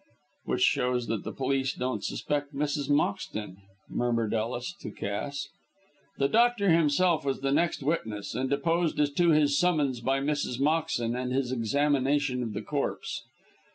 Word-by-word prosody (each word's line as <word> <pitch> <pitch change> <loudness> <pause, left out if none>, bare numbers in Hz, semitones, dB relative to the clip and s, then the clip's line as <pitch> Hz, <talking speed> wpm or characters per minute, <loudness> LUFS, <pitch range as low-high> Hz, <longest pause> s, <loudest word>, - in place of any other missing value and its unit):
"Which - - 0
shows 125 -1 +2
that 110 -3 -1
the - - -4
police 135 0 -1
don't 125 -4 -2
suspect 145 -1 -2
Mrs. 145 0 -1
Moxton," 145 - -1 0.3
murmured 115 -3 0
Ellis 120 - -2
to - - -5
Cass. 140 +8 -4 0.7
The 140 - +2
doctor 230 -1 +3
himself 165 +1 +3
was 135 -1 -2
the 135 0 0
next 160 0 +1
witness, 110 -9 -2
and 130 +1 -1
deposed 165 +3 +1
as 145 -1 +3
to 170 +4 +3
his 150 -3 +4
summons 150 -8 +2
by 135 +3 +1
Mrs. 140 -3 -1
Moxton, 145 -6 +1
and 125 0 -2
his 130 -1 0
examination 140 +2 +1
of 115 -3 -3
the 105 +1 -4
corpse. 145 +3 -3
140 Hz, 155 wpm, -28 LUFS, 125-150 Hz, 0.7 s, his